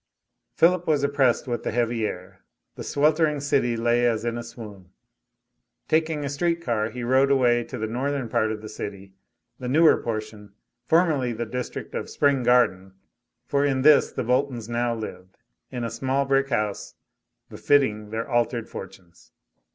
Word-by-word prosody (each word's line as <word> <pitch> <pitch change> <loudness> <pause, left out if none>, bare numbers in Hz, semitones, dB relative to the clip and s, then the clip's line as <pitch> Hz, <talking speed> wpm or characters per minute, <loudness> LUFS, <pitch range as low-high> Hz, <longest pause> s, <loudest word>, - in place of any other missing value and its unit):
Philip 180 +1 +3
was 150 -3 +2
oppressed 140 -4 +2
with 120 -1 -2
the - - -3
heavy 115 -2 0
air; 90 +1 -9 0.3
the - - -8
sweltering 150 +1 +2
city 135 -4 0
lay 120 +1 +2
as 115 -1 -1
in 120 0 -1
a 120 - -4
swoon. 110 -6 -11 1.0
Taking 155 -2 0
a - - -3
street 170 +4 0
car, 115 -8 -1
he 125 0 -7
rode 130 +3 +3
away 120 -3 +3
to - - -7
the 110 - -2
northern 130 +3 -2
part 110 -1 0
of 110 -1 -6
the - - -6
city, 100 -2 -8 0.5
the 125 - -5
newer 155 +5 +4
portion, 110 -2 -6 0.3
formerly 155 -8 +2
the 115 +1 -4
district 125 +2 -6
of - - -4
Spring 140 -2 +2
Garden, 120 -6 +2 0.5
for 140 0 0
in 135 -2 +1
this 150 -1 +5
the - - -3
Boltons 125 -2 0
now 120 0 -1
lived, 95 -4 -8 0.3
in 125 -2 -5
a 115 - -3
small 135 +1 -1
brick 135 0 +1
house, 105 -5 -2 0.5
befitting 110 -7 +1
their 110 +1 -4
altered 120 -2 0
fortunes. 90 -3 -12
120 Hz, 165 wpm, -24 LUFS, 110-140 Hz, 1.0 s, this